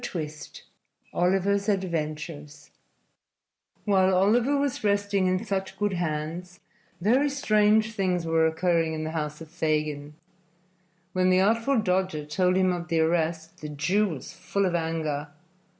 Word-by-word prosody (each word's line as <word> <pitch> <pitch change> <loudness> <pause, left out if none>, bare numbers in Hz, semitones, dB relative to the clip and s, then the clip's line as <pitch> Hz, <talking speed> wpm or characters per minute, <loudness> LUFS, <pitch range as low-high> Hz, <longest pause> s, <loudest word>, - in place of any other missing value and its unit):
II 155 -3 -2 0.8
OLIVER'S 195 +3 +1
ADVENTURES 155 -5 -4 1.1
While 190 -2 +3
Oliver 235 +9 +3
was 280 -4 -1
resting 200 -2 +1
in 185 +4 0
such 195 -2 -3
good 205 -1 0
hands, 170 +1 -4 0.4
very 250 +10 +3
strange 215 -4 +2
things 185 -4 0
were 165 0 +3
occurring 165 0 +1
in 155 - -4
the 155 - -3
house 150 -1 -4
of 160 -1 -10
Fagin. 150 -3 -2 1.0
When 185 0 +2
the 185 0 +4
Artful 230 +5 +2
Dodger 185 -6 0
told 180 +4 +1
him 185 -1 +3
of 170 -1 -5
the 165 +1 +1
arrest 160 0 -1
the 150 - -5
Jew 175 +9 +1
was 155 -8 -7
full 190 +3 -1
of 180 - 0
anger. 160 -3 -2
180 Hz, 135 wpm, -26 LUFS, 160-200 Hz, 1.1 s, the